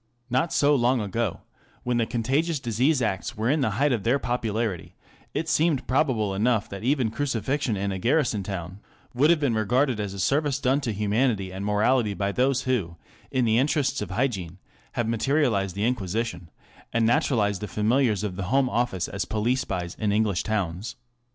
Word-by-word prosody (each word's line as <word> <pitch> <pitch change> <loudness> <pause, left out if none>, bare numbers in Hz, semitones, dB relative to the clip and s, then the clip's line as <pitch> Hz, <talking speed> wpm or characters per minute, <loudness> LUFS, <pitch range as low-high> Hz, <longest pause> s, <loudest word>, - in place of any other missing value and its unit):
Not 130 +7 +1
so 145 +1 +3
long 125 -1 +3
ago, 105 -1 -2 0.4
when 125 -1 0
the 115 -1 +1
Contagious 140 +8 0
Diseases 130 +3 +1
Acts 95 -3 -2
were 110 +4 +1
in 150 0 +1
the 135 - +2
height 145 +1 +3
of 120 -4 0
their 120 +6 +2
popularity, 115 -7 -2 0.4
it 160 - -1
seemed 155 -3 +1
probable 125 -7 +1
enough 110 +2 +1
that 100 +1 -7
even 130 -3 +1
crucifixion 130 -2 -1
in 100 +1 -1
a 95 - -3
garrison 120 -1 +1
town 95 -1 -6 0.3
would 140 +5 +3
have 170 -2 +4
been 140 -5 +1
regarded 120 +3 +1
as 100 -2 -3
a - - -7
service 140 - +1
done 135 +2 +1
to 125 -5 -2
humanity 105 -1 0
and 95 +2 -4
morality 105 +1 +2
by 100 0 -1
those 130 +3 +1
who, 105 -10 -1 0.3
in 130 -2 +1
the 110 +1 +3
interests 145 -2 +1
of 105 - -4
hygiene, 100 -6 -2 0.4
have 120 -2 -1
materialized 115 - +1
the 100 +2 0
Inquisition, 100 -6 -2 0.4
and 115 -1 +2
naturalized 110 - +1
the 105 - -3
familiars 110 -1 +1
of 95 -4 -3
the 100 - -3
Home 135 0 +2
Office 115 -6 0
as 100 -1 -3
police 120 +4 0
spies 90 -8 -4
in 105 -2 +1
English 105 -4 +1
towns. 105 +2 -3
115 Hz, 185 wpm, -25 LUFS, 100-130 Hz, 0.4 s, have